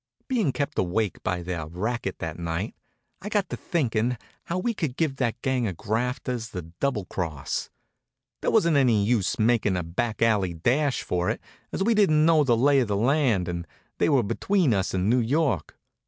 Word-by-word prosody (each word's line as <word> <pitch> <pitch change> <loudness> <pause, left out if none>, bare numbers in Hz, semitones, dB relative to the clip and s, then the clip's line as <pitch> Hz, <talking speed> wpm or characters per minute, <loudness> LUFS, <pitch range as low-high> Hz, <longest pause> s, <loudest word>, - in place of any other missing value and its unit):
Being 225 - +1
kept 145 +3 -2
awake 95 +3 0
some - - -20
by 90 -1 -1
their 85 -3 -4
racket 100 +5 -3
that 80 0 -5
night, 85 +5 -3 0.5
I 205 - -5
got 205 -4 0
to - - -3
thinking 125 -6 0 0.3
how 170 - -2
we 230 +6 0
could 155 - -3
give 150 -5 0
that 120 -2 -1
gang 130 -3 +1
of 90 -5 -4
grafters 120 +2 -2
the 90 -5 -6
double 95 +6 -2
cross. 80 -7 -3 0.7
There - - +1
wasn't 170 -9 +4
any 115 -7 +3
use 115 +1 +1
making 110 -4 +2
a 90 - -1
back 110 +8 -2
alley 100 -6 +2
dash 130 - +1
for 90 0 -1
it, - - -1 0.3
as - - -1
we 230 +3 +3
didn't 155 -8 +4
know 160 -2 +5
the 120 -4 +3
lay 140 +3 +4
of 125 - +1
the 100 -1 0
land 120 - +2
and 85 -1 -4 0.3
they - - +3
were 135 -5 +4
between 175 - +1
us 95 -1 0
and 95 +1 0
New 125 +3 +4
York. 125 - 0
120 Hz, 195 wpm, -26 LUFS, 95-145 Hz, 0.7 s, know